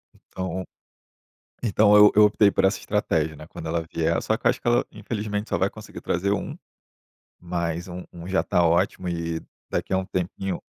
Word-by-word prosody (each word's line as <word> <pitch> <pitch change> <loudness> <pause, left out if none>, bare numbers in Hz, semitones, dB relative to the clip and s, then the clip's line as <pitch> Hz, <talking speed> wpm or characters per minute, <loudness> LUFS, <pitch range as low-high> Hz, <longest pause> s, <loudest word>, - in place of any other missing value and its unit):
Então 95 0 -5 1.0
então 105 -2 +4
eu 105 0 +8
eu 105 - +7
optei 105 0 +5
por - - +1
essa 95 0 +2
estratégia, 80 -7 0
né, 75 - -11
quando 80 - -8
ela 85 +1 0
vier 80 -1 +1
só - - 0
acho - - +2
que - - -5
ela 120 0 +3
infelizmente 105 -2 -4
só - - +1
vai - - +1
conseguir - - -10
trazer 95 +3 0
um, 100 - -3 0.8
mas 85 -1 -3
um 90 0 -7
um 85 -1 -9
já 95 0 +2
tá 90 - +2
ótimo 85 +2 +1
e 85 -1 -2 0.3
daqui - - -2
a 95 - +3
um 95 - -2
tempinho 95 +1 -3
95 Hz, 185 wpm, -24 LUFS, 85-105 Hz, 1.0 s, eu